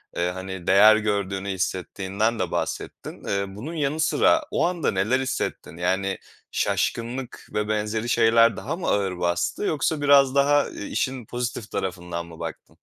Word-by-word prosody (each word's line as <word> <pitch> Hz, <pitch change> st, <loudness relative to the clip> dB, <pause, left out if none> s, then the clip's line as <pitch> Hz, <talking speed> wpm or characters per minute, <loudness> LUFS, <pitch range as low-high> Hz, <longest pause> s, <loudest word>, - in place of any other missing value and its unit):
Eee, 85 Hz, +1 st, 0 dB
hani, 95 Hz, -1 st, -7 dB
değer 105 Hz, +2 st, +7 dB
gördüğünü 100 Hz, -2 st, -1 dB
hissettiğinden 95 Hz, +4 st, -1 dB
de 90 Hz, -2 st, -1 dB
bahsettin. -, -, -4 dB
Eee, 100 Hz, 0 st, -1 dB
bunun 145 Hz, +11 st, -6 dB
yanı 150 Hz, 0 st, -1 dB
sıra 320 Hz, -, +3 dB
o -, -, +2 dB
anda 175 Hz, -7 st, 0 dB
neler 105 Hz, +7 st, +1 dB
hissettin? 130 Hz, -9 st, -3 dB
Yani, 95 Hz, +2 st, 0 dB, 0.3 s
şaşkınlık 120 Hz, +2 st, -2 dB
ve 105 Hz, 0 st, 0 dB
benzeri 110 Hz, +2 st, -1 dB
şeyler 115 Hz, 0 st, +4 dB
daha 155 Hz, +6 st, -3 dB
mı 180 Hz, -, -5 dB
ağır 95 Hz, -3 st, 0 dB
bastı 85 Hz, -, 0 dB
yoksa 155 Hz, -3 st, 0 dB
biraz 140 Hz, -2 st, +5 dB
daha, 145 Hz, +1 st, +5 dB
ııı, -, -, -7 dB
işin 130 Hz, -3 st, -2 dB
pozitif 120 Hz, -2 st, -4 dB
tarafından 90 Hz, -2 st, -3 dB
mı 85 Hz, -1 st, -13 dB
baktın? -, -, -8 dB
110 Hz, 155 wpm, -24 LUFS, 95-130 Hz, 0.3 s, değer